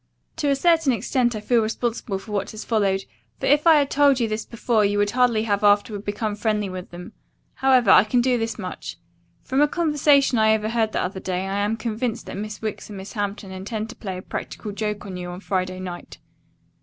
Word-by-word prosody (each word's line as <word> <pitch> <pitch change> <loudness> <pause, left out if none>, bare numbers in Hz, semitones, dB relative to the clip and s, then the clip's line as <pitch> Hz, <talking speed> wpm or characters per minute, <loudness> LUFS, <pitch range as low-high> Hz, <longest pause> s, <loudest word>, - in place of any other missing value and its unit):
"To 295 -3 0
a 280 - +3
certain 325 -1 +3
extent 240 +2 0
I 215 - -4
feel 235 +1 +2
responsible 220 -1 -2
for 210 +3 -11
what 205 -1 -2
has 215 0 -8
followed, 195 -4 +1 0.4
for - - -3
if 295 +3 +3
I 325 - +8
had 285 -2 +2
told 280 -2 +4
you 230 - +1
this 215 0 -3
before 230 -1 0
you 205 0 +1
would 205 0 +2
hardly 245 -3 +2
have 205 -2 0
afterward 205 0 +2
become 205 +1 -2
friendly 210 -2 -1
with 185 0 -7
them. 175 0 -10 0.4
However, 255 -6 +4
I 185 - +8
can 220 +3 +1
do 250 +1 +2
this 225 0 -3
much. 185 -4 -6 0.5
From 265 +2 0
a 295 - +5
conversation 295 -6 +3
I 220 0 +5
overheard 220 +1 0
the - - 0
other 190 +1 -4
day 185 0 -3
I 195 +1 -2
am 210 +2 0
convinced 230 0 -3
that - - -7
Miss 215 +2 -6
Wicks 215 0 -4
and 205 - -8
Miss 190 +1 -8
Hampton 205 -2 -4
intend 215 +4 -5
to - - -12
play 190 -5 -6
a 185 - -8
practical 210 - -6
joke 210 0 -3
on 190 -2 -6
you 180 0 -6
on 175 +1 -7
Friday 185 -2 -2
night. 180 -2 -8
215 Hz, 220 wpm, -23 LUFS, 200-245 Hz, 0.5 s, I